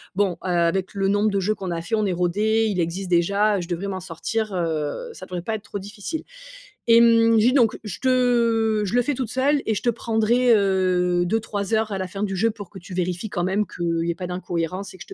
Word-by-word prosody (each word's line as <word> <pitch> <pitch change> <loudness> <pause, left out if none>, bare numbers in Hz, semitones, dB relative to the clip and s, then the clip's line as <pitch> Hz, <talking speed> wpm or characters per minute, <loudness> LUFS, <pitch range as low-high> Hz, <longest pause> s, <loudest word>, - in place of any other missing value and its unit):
Bon, 195 -2 +2
heu, - - -4
avec 175 +1 +1
le 195 -1 0
nombre 205 +2 +2
de 200 -1 0
jeux 210 +3 0
qu'on 190 -3 -5
a 165 -1 -2
faits, 220 +6 -1
on 215 - +1
est 195 - 0
rodées. 210 +6 +1
Il 195 -3 -2
existe 175 +3 -2
déjà. 200 +4 +2
Je 170 - -7
devrais 180 +2 -3
m'en 190 -1 -3
sortir, 200 +5 -3
heu, 165 - -2
ça - - -10
devrait 180 -1 -5
pas 220 +5 -3
être 210 - -7
trop 205 - -6
difficile», 205 - -6 0.7
et 230 0 +8
mmh, 230 -1 +5
je 215 - +4
dis 255 - +4
donc: 240 -5 +3
«Je 205 -5 -6
te 235 -4 +2
je 190 - -4
le 245 - +4
fais 290 - -1
toute 250 -3 -3
seule 275 +3 +2
et 220 - +1
je - - -4
te 240 - +3
prendrai, 230 +2 +2
heu, 185 -3 +2
2-3 210 0 -1
heures, 220 -1 0
à 195 - -2
la 185 - -2
fin 195 +3 -6
du 195 -2 -1
jeu 225 +5 +2
pour 205 -4 -9
que 195 - -10
tu 185 +1 -10
vérifies 180 +3 -2
quand 175 -4 -2
même 200 +3 0
qu'il 170 -1 -2
y - - 0
ait - - -1
pas 180 +2 -6
d'incohérence 180 +2 -4
et - - -10
que - - -8
je - - -16
200 Hz, 260 wpm, -23 LUFS, 180-225 Hz, 0.7 s, et